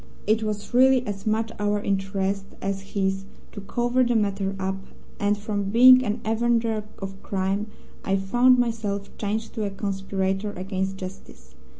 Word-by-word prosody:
It 215 +2 +2
was 210 +1 -4
really 260 0 +5
as 205 0 -5
much 220 +1 0
our 205 0 +1
interest 195 0 -1
as 195 0 -2
his 195 -1 0 0.3
to 205 - -8
cover 240 +5 +1
the 240 -1 +1
matter 200 -2 0
up, 190 0 -2 0.4
and 205 0 +2
from 205 -1 -3
being 255 +4 +8
an 210 -3 -2
avenger 225 -1 +1
of 195 0 -7
crime 195 +2 -1 0.4
I 195 - +1
found 245 +6 +4
myself 220 -4 -2
changed 220 +2 -2
to 220 - -3
a - - -1
conspirator 195 0 -2
against 190 0 -3
Justice. 185 0 -10
205 Hz, 155 wpm, -25 LUFS, 195-225 Hz, 0.4 s, being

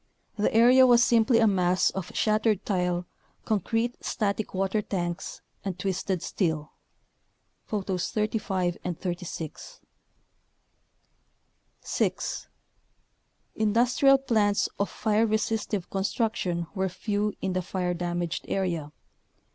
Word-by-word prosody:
The 210 - +1
area 250 +3 +7
was 240 -1 +6
simply 235 0 +4
a 230 - +5
mass 185 -3 +3
of 190 -3 -5
shattered 215 -1 +2
tile, 180 -3 0 0.4
concrete 225 +3 -1
static 210 0 -1
water 195 +3 +1
tanks, 175 -3 -4 0.2
and 190 -3 -4
twisted 190 -2 -2
steel 160 -5 -1 0.9
(Photos 190 -4 -2
35 200 -5 -1
and 175 -2 -4
36.) 175 -3 -6 2.0
6. - - -2 1.1
Industrial 245 +5 +4
plants 215 -6 +2
of 200 - 0
fire 220 +1 +1
resistive 215 -3 -1
construc 210 +3 0
tion 170 -2 -2
were 190 -1 -1
few 205 +3 -2
in 190 -1 -2
the 185 - 0
fire 180 0 -2
damaged 175 -1 -3
area. 170 -6 -2
200 Hz, 105 wpm, -27 LUFS, 180-220 Hz, 2.0 s, area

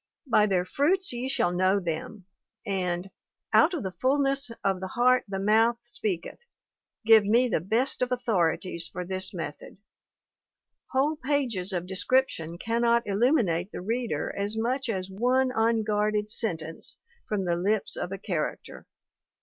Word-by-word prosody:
'By 215 -5 +4
their 180 -3 +1
fruits 345 - +1
ye 245 +2 -3
shall 175 -9 +1
know 185 +2 +2
them/ 175 +3 -5 0.4
and 185 -2 -2 0.4
'Out 345 +4 +5
of 300 - -4
the 190 - -3
fullness 275 +3 +1
of 195 -1 +1
the 190 - -4
heart 250 +5 +3
the 195 -1 -4
mouth 225 +4 +3
speak 205 -7 -3
eth' 475 - -12 0.6
give 220 -1 +7
me 235 +5 +3
the 220 - 0
best 225 +11 +1
of 250 0 0
authorities 185 -8 0
for 180 - -6
this 185 +1 -1
method; 165 -4 -7 1.1
whole 290 +4 +1
pages 255 - 0
of 175 -2 -2
description 190 -3 0
cannot 235 +3 +1
illuminate 200 - +1
the - - -6
reader 225 -6 -2
as 205 +2 -2
much 255 +3 -1
as 190 -4 -2
one 255 +6 +1
unguarded 215 -2 +1
sentence 165 -8 -2 0.3
from 200 -3 -1
the 175 -1 +1
lips 195 +4 0
of 180 - -4
a 195 - -4
character. 180 -6 -4
210 Hz, 150 wpm, -27 LUFS, 185-245 Hz, 1.1 s, give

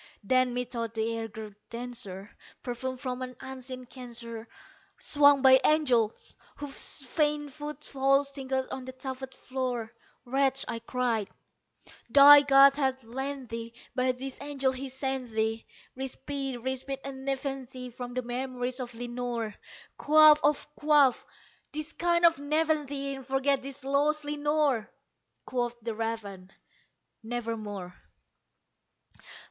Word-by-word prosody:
Then, 255 +3 +2
methought 235 -2 -3
the 225 +1 0
air 225 0 -3
grew 215 -1 -9 0.2
denser, 230 -5 -7 0.3
perfumed 255 +1 -4
from 255 -1 -4
an 255 0 -5
unseen 255 -1 -7
censer 235 -2 -8 0.5
Swung 285 -2 +5
by 260 0 +8
angels 255 -8 +2 0.2
whose 290 0 -1
faint 295 +1 0
foot 300 0 -7
falls 275 +1 +2
tinkled 265 -1 -2
on 260 -1 -5
the 260 - -7
tufted 260 0 -6
floor. 250 -4 -3 0.3
"Wretch," 270 +1 +1
I 230 - -3
cried, 230 -3 -1 0.8
"thy 285 +3 +10
God 275 -1 +7
hath 265 -2 -1
lent 265 +2 -5
thee 230 0 -6 0.2
by 255 0 +2
these 260 +1 -7
angels 275 -2 0
he 260 +1 -5
has 265 -1 -7
sent 265 -2 -2
thee 220 0 -1 0.3
Respite 270 0 -4
respite 265 +1 -3
and 265 -1 -7
nepenthe 265 -2 -4
from 245 0 -7
the 255 - -1
memories 250 +1 -3
of 245 -2 -6
Lenore! 240 -2 -3 0.4
Quaff, 305 0 +7
oh 295 +1 +5 0.2
quaff 295 -4 +4 0.5
this 305 +1 -4
kind 345 0 +2
nepenthe, 290 -2 0
and 265 - -9
forget 270 0 +1
this 275 +1 -8
lost 290 +2 +1
Lenore!" 295 -5 +1 0.6
Quoth 240 -1 -2
the 230 0 -4
raven, 210 -4 -5 0.7
"Nevermore." 220 -5 -4
260 Hz, 125 wpm, -29 LUFS, 240-275 Hz, 0.8 s, thy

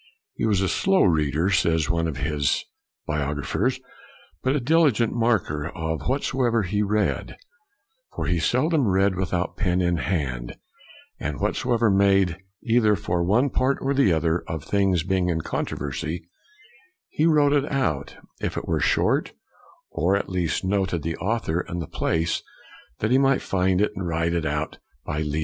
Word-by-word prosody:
" 410 -3 -63
He - - +1
was 100 -3 +2
a 95 - +1
slow 195 - +2
reader," 80 +1 +2
says 80 -5 +2
one 85 -1 0
of 75 -4 -4
his 70 +1 0 0.4
biographers, 75 -2 -1 0.3
" 80 - -27
but 130 +2 +1
a - - +2
dili 155 +4 +4
gent 115 0 0
marker 110 -11 0
of 80 -2 -4
whatsoever 125 -4 +1
he 105 +3 -1
read; 105 0 -1 0.8
for - - -3
he 90 -2 +1
seldom 140 - +2
read 95 +1 +3
without 90 -1 -2
pen 90 -3 +1
in 85 -1 +1
hand, 70 -8 -2 0.6
and 75 0 -4
whatsoever 120 -3 +1
made 95 -2 +4
for 85 - -8 0.3
either 115 -2 +3
one 100 +10 +1
part 130 +2 +1
or 135 +1 0
the 135 -9 +3
other 80 +1 +1
of 80 -3 -4
things 95 -1 +1
being 95 -1 0
in 80 -1 0
controversy, 80 +4 -4 0.8
he 155 - +1
wrote 145 -3 +4
it 145 0 +1
out 90 - -1 0.2
if - - -3
it - - -4
were - - +1
short, - - +1 0.6
or, 90 +6 +1
at 100 - -2
least, 90 -1 -1
noted 95 -4 0
the 80 +1 -2
author 95 -5 -1
and 85 - -4
the 85 - -3
place, 80 +3 -1 0.6
that 110 - 0
he 130 - +5
might 135 -1 +3
find 95 -1 +1
it 105 - +2
and 95 -2 -4
write 85 0 0
it 85 -2 0
out 75 +1 -3 0.3
by 75 - -3
leisure." 75 0 -2
95 Hz, 170 wpm, -24 LUFS, 80-115 Hz, 0.8 s, he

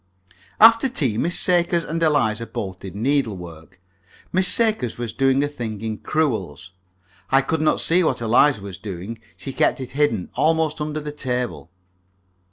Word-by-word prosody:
After 230 +4 +7
tea 130 - 0
Miss 175 +3 +1
Sakers 175 -1 +2
and 165 +1 -4
Eliza 115 -8 +1
both 95 -3 -6
did 95 0 -9
needlework. 95 - -3 0.5
Miss 185 +1 +3
Sakers 220 - +1
was 120 -2 -5
doing 135 +1 +2
a - - 0
thing 115 -7 -6
in 110 -1 -4
crewels. 100 - -2 0.6
I 135 +1 +4
could 155 +3 -1
not 155 - +2
see 180 +2 +3
what - - 0
Eliza 115 0 +3
was 100 -3 -8
doing. 100 +2 -7 0.2
She 135 - -7
kept - - +1
it 130 -1 -6
hidden, 145 -9 0
almost 160 -1 +1
under 155 0 -3
the 150 0 -6
table. 125 - -4
135 Hz, 160 wpm, -22 LUFS, 110-155 Hz, 0.6 s, After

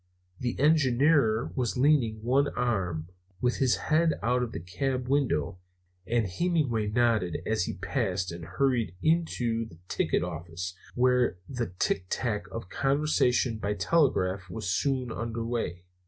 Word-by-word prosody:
The 120 -1 -2
engineer 140 -5 +3
was 125 -2 -1
leaning 130 -5 +3
on 110 - -14
one 135 +4 +3
arm, 95 -10 -1 0.3
with 125 +3 +1
his 130 -3 +3
head 160 +1 +2
out 125 +2 +2
of 120 -2 -2
the - - -5
cab 125 +9 -2
window, 130 - 0 0.5
and 115 -1 +1
Hemenway 125 - 0
nodded 110 -5 +1
as 110 -5 +1
he - - -3
passed 95 -3 -1
and 85 0 -7
hurried 115 0 0
into 125 -9 +1
the 85 - -15
ticket - - 0
office, 85 +1 -5 0.2
where 125 -4 +3
the 120 -3 -3
ticktack 105 +5 -1
of 115 - -5
a 90 - -15
conversation 135 -5 +2
by 105 0 -1
telegraph 95 - +1
was 110 +2 -5
soon 130 +4 0
under 115 0 -3
way. 115 -7 -3
115 Hz, 145 wpm, -28 LUFS, 95-135 Hz, 0.5 s, engineer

